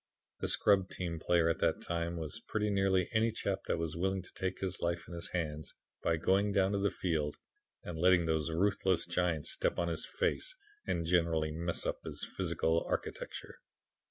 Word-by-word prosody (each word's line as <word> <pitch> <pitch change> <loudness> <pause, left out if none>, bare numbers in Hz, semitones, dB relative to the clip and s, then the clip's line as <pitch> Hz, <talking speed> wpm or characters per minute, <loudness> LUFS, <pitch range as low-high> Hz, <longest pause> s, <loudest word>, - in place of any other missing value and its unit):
The - - -1
scrub 95 -2 +4
team 85 -3 -3
player 85 0 +3
at 80 -1 +1
that - - +2
time 85 0 -2
was 80 +7 -5
pretty 105 -1 0
nearly 95 -2 +3
any 110 +1 +3
chap 100 -3 -2
that - - +1
was 80 -1 -2
willing 95 +2 0
to - - -15
take 95 0 -3
his 95 -2 -2
life 85 0 -1
in - - -9
his 85 0 -4
hands 75 -3 -3 0.3
by 80 - +2
going 100 +5 +2
down 95 -1 +3
to 100 - +1
the 100 0 +2
field 80 -7 -1 0.5
and 80 -2 -5
letting 90 0 +5
those 80 -1 +1
ruthless 95 0 +2
giants 85 -3 +1
step - - +1
on 85 0 +1
his 80 - -2
face 380 0 -1 0.3
and 85 - 0
generally 80 -2 +2
muss 85 +2 -2
up - - -1
his - - -4
physical 80 +1 +1
architecture. - - -4
85 Hz, 185 wpm, -33 LUFS, 80-95 Hz, 0.5 s, letting